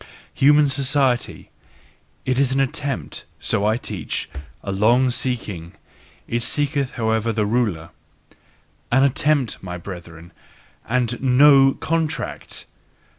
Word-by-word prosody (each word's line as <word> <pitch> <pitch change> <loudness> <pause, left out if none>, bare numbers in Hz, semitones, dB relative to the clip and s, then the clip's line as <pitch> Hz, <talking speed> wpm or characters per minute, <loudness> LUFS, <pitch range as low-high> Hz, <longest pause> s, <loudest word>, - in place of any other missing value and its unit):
Human 145 +1 +5
society: 135 -2 0 0.7
it 130 0 0
is 135 -2 +2
an 135 - +1
attempt 135 - -3 0.2
so 100 - +1
I 110 +1 +2
teach 105 - -4 0.3
a 100 - -4
long 120 +6 +3
seeking: 105 -10 -3 0.5
it 120 +1 -1
seeketh 140 +1 +1
however 110 0 0
the 110 -1 0
ruler! 105 -8 -1 1.0
An 130 +3 +4
attempt, 140 -2 +1
my 90 -1 -6
brethren! 85 -2 -10 0.6
And 125 0 0
NO 135 +1 +6
"contract"! 160 -1 -3
125 Hz, 110 wpm, -21 LUFS, 105-135 Hz, 1.0 s, NO